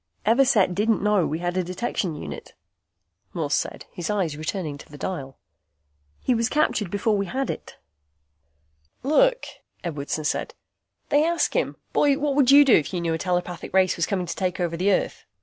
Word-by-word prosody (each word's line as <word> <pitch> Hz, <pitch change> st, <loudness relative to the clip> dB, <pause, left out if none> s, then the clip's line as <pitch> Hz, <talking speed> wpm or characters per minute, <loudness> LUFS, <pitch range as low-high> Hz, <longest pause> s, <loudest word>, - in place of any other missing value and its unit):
"Everset 225 Hz, -5 st, +4 dB
didn't 210 Hz, +3 st, +1 dB
know 210 Hz, -5 st, +3 dB
we 155 Hz, -, -2 dB
had 175 Hz, +1 st, -3 dB
a 185 Hz, -, +1 dB
detection 185 Hz, -2 st, -3 dB
unit," 75 Hz, -, -8 dB, 0.8 s
Morse -, -, -1 dB
said, -, -, -2 dB
his 175 Hz, -, -5 dB
eyes 190 Hz, -8 st, 0 dB
returning 155 Hz, 0 st, -4 dB
to -, -, -14 dB
the 145 Hz, -, -11 dB
dial. 140 Hz, -7 st, -5 dB, 0.8 s
"He 255 Hz, -, +1 dB
was 230 Hz, 0 st, +1 dB
captured 260 Hz, -, +1 dB
before 210 Hz, +3 st, +1 dB
we 200 Hz, -1 st, -1 dB
had 265 Hz, +7 st, -2 dB
it." -, -, -9 dB, 1.3 s
"Look," -, -, +3 dB, 0.4 s
Edwardson 155 Hz, -2 st, -3 dB
said, 150 Hz, -, -2 dB, 0.5 s
"They 290 Hz, +1 st, +4 dB
ask 340 Hz, +1 st, +1 dB
him, -, -, 0 dB, 0.2 s
'Boy, 285 Hz, -2 st, +3 dB
what 290 Hz, -1 st, 0 dB
would 275 Hz, -2 st, +3 dB
you 285 Hz, +1 st, +8 dB
do 265 Hz, -, +5 dB
if 160 Hz, +4 st, +2 dB
you -, -, 0 dB
knew 170 Hz, -1 st, -1 dB
a 160 Hz, -, -2 dB
telepathic 180 Hz, 0 st, -3 dB
race 185 Hz, -1 st, +4 dB
was 170 Hz, -, 0 dB
coming 190 Hz, -4 st, -1 dB
to 170 Hz, -, -5 dB
take 185 Hz, -1 st, -2 dB
over 170 Hz, -2 st, -1 dB
Earth? 185 Hz, +3 st, 0 dB
190 Hz, 180 wpm, -24 LUFS, 170-245 Hz, 1.3 s, you